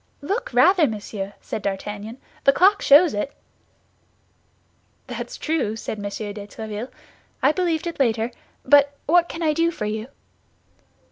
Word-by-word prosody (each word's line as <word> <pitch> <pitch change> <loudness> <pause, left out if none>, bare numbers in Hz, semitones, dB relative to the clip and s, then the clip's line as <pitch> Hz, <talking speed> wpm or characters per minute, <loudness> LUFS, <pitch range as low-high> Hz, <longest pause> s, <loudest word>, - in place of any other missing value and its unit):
"Look, 460 +10 -2
rather, 365 -5 +5
monsieur," 205 -2 -5
said - - -5
D'Artagnan, 205 +3 -5 0.3
"the 275 - +6
clock 390 +7 +4
shows 305 +4 +6
it." 210 +7 -3 1.7
"That's - - -6
true," 305 -9 -1
said 220 -1 -5
M. 205 - -6
de 205 0 -5
Tréville; 220 +2 -6 0.5
"I 275 - +6
believed 340 -1 -1
it 340 -3 -5
later. 230 -2 +1 0.3
But 285 +1 +5
what 345 +2 +3
can 330 - -5
I 310 -1 +2
do 330 +2 +2
for 265 -10 -5
you?" 215 +2 -3
265 Hz, 140 wpm, -23 LUFS, 210-330 Hz, 1.7 s, the